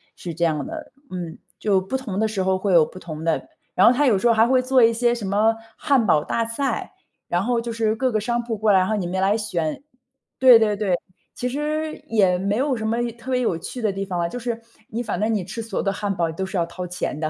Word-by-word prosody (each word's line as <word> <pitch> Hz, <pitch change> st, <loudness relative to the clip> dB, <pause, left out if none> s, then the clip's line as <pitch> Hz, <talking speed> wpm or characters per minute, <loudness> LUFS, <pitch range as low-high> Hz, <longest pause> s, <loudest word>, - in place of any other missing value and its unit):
是 170 Hz, -, -6 dB
这 170 Hz, 0 st, +1 dB
样 155 Hz, -, 0 dB
的， 315 Hz, -2 st, -7 dB, 0.2 s
嗯。 175 Hz, -3 st, -5 dB, 0.2 s
就 200 Hz, -3 st, +2 dB
不 190 Hz, +8 st, -4 dB
同 220 Hz, -8 st, -3 dB
的 220 Hz, -, +2 dB
时 200 Hz, -3 st, -2 dB
候 190 Hz, 0 st, +2 dB
会 190 Hz, -1 st, 0 dB
有 160 Hz, -3 st, +6 dB
不 185 Hz, -, -11 dB
同 160 Hz, -2 st, -7 dB
的 165 Hz, -1 st, 0 dB, 0.3 s
然 185 Hz, -, +5 dB
后 245 Hz, -, +7 dB
它 290 Hz, +3 st, +2 dB
有 215 Hz, -7 st, +4 dB
时 240 Hz, -, +2 dB
候 230 Hz, -, +5 dB
还 225 Hz, +1 st, +5 dB
会 255 Hz, +1 st, +3 dB
做 255 Hz, -1 st, +4 dB
一 230 Hz, -, +6 dB
些 240 Hz, +1 st, +1 dB
什 225 Hz, -, -5 dB
么 210 Hz, +3 st, +2 dB, 0.2 s
汉 270 Hz, -6 st, +2 dB
堡 155 Hz, -5 st, +4 dB
大 230 Hz, -, -1 dB
赛， 265 Hz, +4 st, -2 dB, 0.4 s
然 175 Hz, +1 st, +1 dB
后 240 Hz, 0 st, +1 dB
就 235 Hz, 0 st, -4 dB
是 225 Hz, -1 st, 0 dB
各 255 Hz, +1 st, 0 dB
个 215 Hz, -, +1 dB
商 240 Hz, +1 st, -1 dB
铺 230 Hz, -2 st, -3 dB
过 215 Hz, 0 st, +2 dB
来， 190 Hz, -, +6 dB
然 185 Hz, -, +1 dB
后 215 Hz, -, +1 dB
你 180 Hz, -4 st, -2 dB
们 185 Hz, +1 st, -2 dB
来 200 Hz, +3 st, +3 dB
选 175 Hz, -, -2 dB, 0.6 s
对 250 Hz, -3 st, +8 dB
对 210 Hz, -2 st, +2 dB
对， 200 Hz, -3 st, 0 dB, 0.4 s
其 250 Hz, -, -3 dB
实 305 Hz, +3 st, -2 dB
也 190 Hz, -5 st, +3 dB
没 200 Hz, +3 st, -1 dB
有 275 Hz, 0 st, +1 dB
什 220 Hz, -2 st, -4 dB
么 230 Hz, +2 st, 0 dB
有 240 Hz, -, -1 dB
特 240 Hz, +2 st, -8 dB
别 255 Hz, -, +2 dB
有 180 Hz, -8 st, 0 dB
趣 235 Hz, +8 st, -7 dB
的 215 Hz, -2 st, +1 dB
地 195 Hz, -, -3 dB
方 180 Hz, -2 st, -3 dB
了， 170 Hz, -, +1 dB
就 245 Hz, -, -6 dB
是 235 Hz, -1 st, -4 dB, 0.3 s
你 230 Hz, +2 st, -3 dB
反 220 Hz, -, -3 dB
正 225 Hz, +1 st, +1 dB
你 195 Hz, -5 st, -1 dB
吃 230 Hz, +4 st, -5 dB
所 220 Hz, -3 st, -4 dB
有 -, -, -1 dB
的 195 Hz, -, 0 dB
汉 200 Hz, 0 st, -2 dB
堡 170 Hz, -2 st, 0 dB
都 190 Hz, +4 st, -3 dB
是 190 Hz, 0 st, -4 dB
要 170 Hz, -, +2 dB
掏 180 Hz, +1 st, -7 dB
钱 180 Hz, -4 st, -4 dB
的， 155 Hz, 0 st, -2 dB
215 Hz, 300 characters per minute, -23 LUFS, 185-240 Hz, 0.6 s, 对